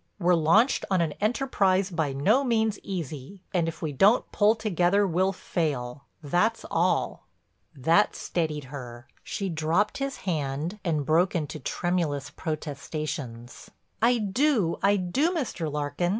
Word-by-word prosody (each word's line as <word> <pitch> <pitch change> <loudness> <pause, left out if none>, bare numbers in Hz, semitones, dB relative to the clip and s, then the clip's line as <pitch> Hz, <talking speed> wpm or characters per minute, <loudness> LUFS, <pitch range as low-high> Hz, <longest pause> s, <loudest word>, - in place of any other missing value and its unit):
We're 180 -2 +3
launched 175 - +4
on 190 -2 +2
an 165 -3 +1
enterprise 205 -5 +1
by 160 -5 -1
no 200 - +2
means 220 -4 +1
easy 170 0 -6
and 170 -3 +1
if 165 - -6
we 155 - -1
don't 195 - +3
pull 210 +2 +4
together 200 -2 +2
we'll 185 +1 +1
fail, 145 -8 -3 0.2
that's 180 +10 +1
all." - - 0 0.5
That 165 +9 +3
steadied 155 -4 -2
her. 120 -3 -8 0.2
She 195 - -3
dropped 170 - 0
his 275 0 -3
hand 155 +2 -2
and 155 -6 0
broke 170 +6 +2
into 155 -2 -3
tremulous 150 -2 -2
protestations: 145 -6 -5 0.3
"I 240 +2 +4
do, 215 - +1
I 200 +1 +4
do, 260 - +1
Mr. 185 - -2
Larkin. 145 +4 -1
175 Hz, 135 wpm, -27 LUFS, 150-205 Hz, 0.5 s, launched